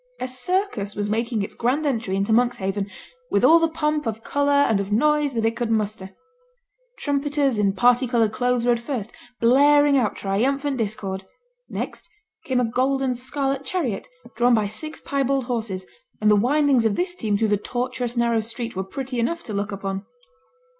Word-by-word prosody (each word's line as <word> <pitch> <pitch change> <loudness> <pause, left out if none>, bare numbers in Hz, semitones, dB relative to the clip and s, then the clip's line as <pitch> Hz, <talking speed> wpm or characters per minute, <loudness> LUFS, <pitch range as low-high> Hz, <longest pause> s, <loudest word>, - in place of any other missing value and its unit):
A 255 - -2
circus 255 - -1
was 205 0 -2
making 230 -1 0
its - - -6
grand 265 +6 0
entry 225 -8 -1
into 200 +3 +1
Monkshaven, 205 -4 +1 0.4
with - - +1
all 335 +1 +7
the 330 - +3
pomp 300 -3 -1
of 225 0 -4
colour 285 0 0 0.2
and 215 -3 +2
of 200 +1 -4
noise 295 +5 +2
that 225 -1 0
it 225 0 +1
could 235 -1 -2
muster. 210 -3 -2 0.8
Trumpeters 285 -4 0
in 200 -2 +2
parti 245 +3 +3
coloured 230 -3 +1
clothes 245 0 0
rode 240 -1 +3
first, 235 -3 -4 0.3
blaring 285 +3 +5
out 215 -5 0
triumphant 270 +8 0
discord. 200 -4 -3 0.4
Next - - -5 0.4
came 255 -2 +1
a 250 - +2
gold 260 +4 0
and 255 -2 0
scarlet 270 +2 -1
chariot 275 - -2 0.3
drawn 240 0 +4
by 215 -2 +1
six 310 +10 -4
piebald 275 -1 0
horses, 220 -7 -3 0.3
and 215 0 +4
the - - +6
windings 270 +3 +3
of 205 - -1
this 355 0 -1
team 220 - -1
through 220 +1 +1
the 205 - +3
tortuous 245 +2 -3
narrow 235 -1 +2
street 230 +1 -5
were 190 - -2
pretty 255 +5 -5
enough 335 +9 -1
to 215 - -6
look 205 +1 -2
upon. 195 0 -4
240 Hz, 180 wpm, -23 LUFS, 215-275 Hz, 0.8 s, all